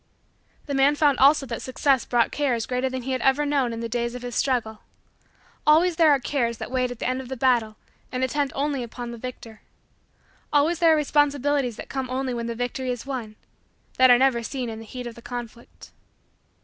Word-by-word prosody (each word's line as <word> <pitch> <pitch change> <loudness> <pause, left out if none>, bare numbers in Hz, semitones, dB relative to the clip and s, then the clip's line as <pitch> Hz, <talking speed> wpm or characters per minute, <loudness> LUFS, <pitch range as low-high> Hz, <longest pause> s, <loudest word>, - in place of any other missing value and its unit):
The 285 - -4
man 275 +2 +4
found 290 -3 +2
also 280 +1 +5
that 230 -3 -5
Success 260 0 +1
brought 240 -1 +1
cares 250 -6 0
greater 255 +1 -1
than 260 -1 -5
he 265 - -4
had 255 - -1
ever 270 +2 +2
known 280 -4 +1
in 230 0 -5
the 230 - -3
days 235 +1 -2
of 250 - -7
his 245 -1 -5
struggle. 225 -4 -1 0.9
Always 325 +3 +4
there 325 -2 +5
are 285 - +5
cares 240 -3 -1
that - - -7
wait 255 -1 0
at 245 - -7
the - - -3
end 255 +1 -1
of 255 - -11
the 265 - -5
battle 235 -4 +2 0.4
and 255 0 -2
attend 280 +1 0
only 280 -1 -1
upon 240 0 -6
the 235 - -8
victor. 230 -3 -9 0.9
Always 305 +4 +2
there 330 -2 +5
are - - +3
responsibilities 290 -3 +1
that - - -9
come 265 -2 -4
only 260 0 -2
when 235 -1 -3
the 235 - -4
victory 245 +2 -3
is 245 0 -4
won 245 -6 -5 0.6
that 255 0 +7
are 245 - +8
never 260 -2 +2
seen 245 +1 -4
in 220 - -7
the 225 - -10
heat 250 +2 -7
of 240 - -6
the 235 - -14
conflict. 240 -1 -9
255 Hz, 215 wpm, -24 LUFS, 235-280 Hz, 0.9 s, are